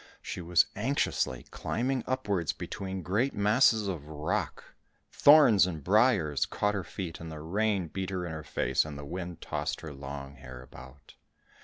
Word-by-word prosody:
She - - -5
was 85 0 +4
anxiously 105 - -1
climbing 130 +1 -2
upwards 100 - -1
between 95 -1 -5
great 115 +9 0
masses 105 +1 +4
of 80 -7 -4
rock; 75 0 -3 0.5
thorns 125 - +7
and 80 -5 -5
briars 95 - +3
caught 105 0 0
her 100 -2 -2
feet, 85 -2 -6
the 80 -2 -7
rain 100 +3 0
beat 95 +3 -4
in 95 -1 -3
her 80 -1 -6
face, - - +1
and 75 -2 -7
the 70 - -7
wind 90 +2 -6
tossed - - -3
her 75 -2 -7
long 70 0 -8
hair 65 -1 -10
about. 65 +2 -14
90 Hz, 155 wpm, -29 LUFS, 75-105 Hz, 0.5 s, thorns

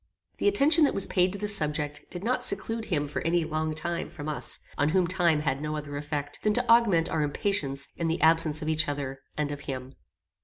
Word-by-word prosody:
The - - +1
attention 330 -5 +5
that - - 0
was 195 - +6
paid 180 0 +1
to 200 - -4
this 205 0 +5
subject 150 -2 -2
did 175 +1 -7
not 250 +2 0
seclude 225 0 0
him 150 -7 -1
for 145 - -4
any 170 0 +1
long 155 0 -2
time 170 +2 -2
from 145 0 -8
us, 155 - -3 0.2
on 145 - +1
whom 185 +2 +2
time 170 -3 +2
had 140 -2 -1
no 155 0 -3
other 145 -1 -6
effect 145 0 -4
than 210 - +1
to - - 0
augment 210 -8 +4
our 160 - -1
impatience 145 -3 -2
in 170 - -1
the 165 +1 -1
absence 160 -1 +3
of - - -5
each 155 0 +1
other 140 -2 -4 0.2
and 150 -1 -1
of 145 - -5
him. 130 0 -5
155 Hz, 225 wpm, -27 LUFS, 145-185 Hz, 0.2 s, was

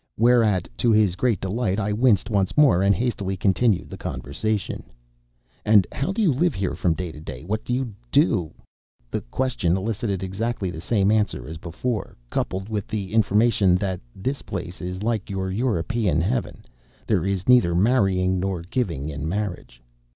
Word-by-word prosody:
Whereat, 110 -6 +3
to 120 - +3
his 105 -4 +3
great 115 -1 +1
delight, 95 0 -1
I 105 0 0
winced 115 -2 +2
once 100 +2 0
more 140 -12 +5
and 100 0 +4
hastily 100 -5 -2
continued 100 +1 +2
the - - -8
conversation: 105 +8 -3 0.8
"And 105 -3 +5
how 140 +8 -2
do 220 +3 0
you 170 -8 +4
live 165 +3 +1
here 95 -1 -1
from 85 -3 0
day 90 -1 -4
to 75 - -11
day? 75 -3 -8
What 105 +5 -3
do - - -5
you 125 -3 -1 0.2
do?" 80 +4 +2 0.6
The - - -2
question 95 - 0
elicited 100 -1 -2
exactly 95 0 -2
the 80 -1 -7
same 100 0 +2
answer 110 -2 0
as 80 +1 -7
before 105 +8 -4
coupled 95 +2 -2
with 105 -2 -3
the 105 -2 -4
information 105 -3 +3
that 95 -1 -2
"this 130 +8 -3
place 90 -1 -6
is 90 +2 -5
like 110 -2 -1
your 95 -1 -2
European 105 - 0
heaven; 110 +9 -2 0.4
there - - +1
is 95 -1 -2
neither 120 -9 +5
marrying 95 -3 +2
nor 95 -2 -2
giving 85 - -2
in 75 0 -4
marriage." 90 - -4
100 Hz, 170 wpm, -24 LUFS, 90-115 Hz, 0.8 s, more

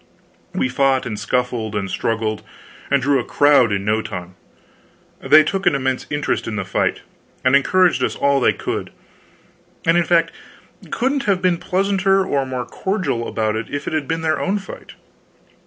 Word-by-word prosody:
We - - +1
fought 135 +1 +1
and 105 -3 -4
scuffled 115 0 -2
and 100 -2 -2
struggled, 110 +2 -2 0.5
and 140 -2 +2
drew 140 0 +3
a - - -2
crowd 145 -6 +4
in 100 -1 -1
no 110 +1 +1
time. 95 -4 -7 0.9
They 150 +3 +6
took 190 +6 -2
an - - +4
immense 130 -1 -2
interest 145 0 -2
in 110 - -3
the 95 -2 -3
fight 95 - -1 0.4
and 130 +2 +5
encouraged 180 +5 +3
us - - -1
all 140 0 +2
they - - +4
could, - - -4 1.0
and, 165 - +4
in 175 - +3
fact, 165 0 +2 0.6
couldn't 270 +3 -1
have 195 -4 +2
been 180 -1 +2
pleasanter 195 +1 +1
or 140 -6 -1
more 125 -1 -4
cordial 165 - -2 0.4
if 145 0 -4
it - - -3
had 155 -3 -1
been 165 0 -2
their 155 -1 0
own 195 +2 0
fight. 195 - -10
140 Hz, 170 wpm, -20 LUFS, 115-175 Hz, 1.0 s, They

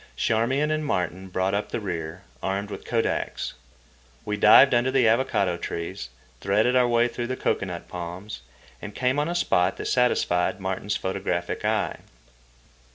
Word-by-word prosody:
Charmian 130 +7 +1
and 155 0 0
Martin 95 - -2
brought 95 +1 0
up 100 +1 -1
the - - -2
rear, 85 -4 -5 0.2
armed 100 +2 -2
with - - -7
kodaks. 115 -1 -1 0.7
We 105 - -1
dived 110 +6 +7
under 120 +2 +3
the 130 -3 +3
avocado 110 -6 +2
trees, 85 -8 -5 0.3
threaded 105 +6 +2
our 125 -1 +4
way 120 0 +3
through 120 0 -4
the 130 - -2
cocoanut 90 -3 -2
palms, 90 +1 -7 0.4
and 105 - -8
came 130 +3 +1
on 150 +3 0
a 175 - -2
spot 90 - +2
that - - -5
satisfied 95 -8 +1
Martin's 95 +2 -2
photographic 95 -2 -3
eye. - - 0
105 Hz, 155 wpm, -25 LUFS, 90-125 Hz, 0.7 s, dived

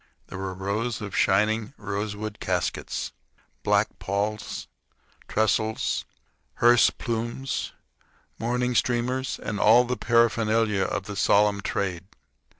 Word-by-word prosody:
There - - -7
were 95 -1 -4
rows 105 +5 -2
of 105 -3 -6
shining 110 +5 +2
rosewood 105 +1 -4
caskets, - - -2 0.5
black - - +1
palls, 105 +2 -3 0.6
trestles, 110 0 0 0.5
hearse 120 0 +6
plumes, 120 +3 -3 0.7
mourning 125 +2 0
streamers, 125 +2 0
and 105 - -4
all 120 +3 +6
the 125 0 -2
paraphernalia 115 -3 +2
of - - -2
the 105 +1 -7
solemn 100 +1 +3
trade. 95 -3 -2
110 Hz, 105 wpm, -26 LUFS, 100-120 Hz, 0.7 s, hearse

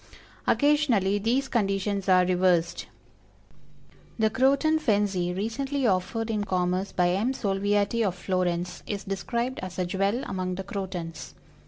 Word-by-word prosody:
Occasionally 255 -10 +3
these 245 +6 +1
conditions 195 -3 -1
are 185 -1 +5
reversed. 175 -2 +1 1.3
The 220 -1 +2
Croton 280 +6 +3
Fenzii, 200 - +1
recently 270 +6 -2
offered 220 +3 0
in 210 -2 -1
commerce 185 0 -1
by 180 -1 +2
M. 215 +8 0
SOLVIATI, 205 +1 0
of 190 -4 0
Florence, 180 -1 -2
is 205 -1 -3
described 235 +6 -3
as 185 -1 -7
a 185 - 0
jewel 195 +7 0
among 185 -4 -3
the 190 - -5
Crotons. 185 -5 -6
195 Hz, 130 wpm, -26 LUFS, 185-230 Hz, 1.3 s, are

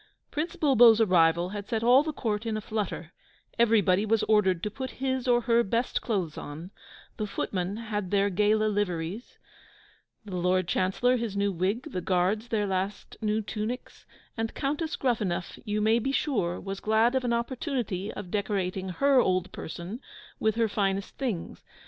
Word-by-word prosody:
Prince 310 +3 -2
Bulbo's 240 -6 +6
arrival 175 -4 +4
had 205 0 -6
set 225 -2 -1
all 250 +3 +7
the 310 +1 -2
court 225 -5 -2
in 220 -1 -1
a - - -4
flutter; 200 -5 -4 0.5
everybody 210 -4 +4
was 220 0 +2
ordered 190 -5 +2
to 210 - -2
put 260 +4 -5
his 260 -1 -1
or 240 -1 +4
her 235 0 +3
best 235 +3 -1
clothes 185 -9 -2
on: 160 +6 -8 0.5
the 215 - -2
footmen 190 0 -3
had 210 -4 -3
their 200 0 +2
gala 210 +3 +3
liveries; 200 0 -2 0.9
the 195 -3 -6
Lord 180 0 +1
Chancellor 195 +9 +2
his 225 -4 -3
new 200 0 +1
wig; 195 - -2
the 180 - -3
Guards 190 +6 +1
their 220 -3 0
last 195 +1 -3
new 215 0 0
tunics; 220 +4 -5 0.3
and 225 -1 -3
Countess 305 +4 -2
Gruffanuff, 210 -9 -1
you 210 0 -1
may 220 +2 +4
be 270 +4 -1
sure, 205 - 0
was 195 0 -5
glad 220 +3 +3
of 260 -1 +1
an 245 - 0
opportunity 235 - -2
of 185 -4 -8
decorating 190 -2 -1
her 275 +8 +3
old 185 -4 +1
person 175 +8 -7 0.4
with 220 -1 +1
her 230 -1 +2
finest 200 -1 -1
things. 235 -11 -3
210 Hz, 165 wpm, -28 LUFS, 190-235 Hz, 0.9 s, all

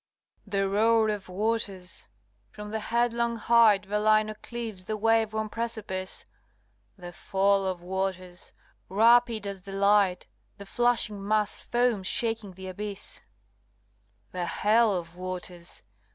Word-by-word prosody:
LXIX. - - -17
The 195 -1 +1
roar 220 +2 +3
of 205 -3 -4
waters! 195 -2 -2 0.4
from 210 - -9
the 220 - -2
headlong 235 +1 0
height 225 -3 +5
Velino 215 +1 +2
cleaves 225 -6 -6
the 215 +2 -2
wave 225 0 +2
worn 220 0 -2
precipice; 215 -4 -4 0.7
The 175 -1 -9
fall 195 +1 +1
of 180 -2 -4
waters! 185 -1 -4 0.4
rapid 230 +2 +4
as 200 -1 -5
the 195 +1 -9
light 200 -2 +3 0.3
The 200 - -9
flashing 225 -2 +1
mass 210 -1 +1
foams 240 -5 +1
shaking 225 -4 -1
the 190 +1 -10
abyss; 200 +2 -4 1.1
The 180 -1 -3
hell 215 +6 +3
of 175 -3 -4
waters! 180 -1 -6
205 Hz, 125 wpm, -27 LUFS, 190-225 Hz, 1.1 s, height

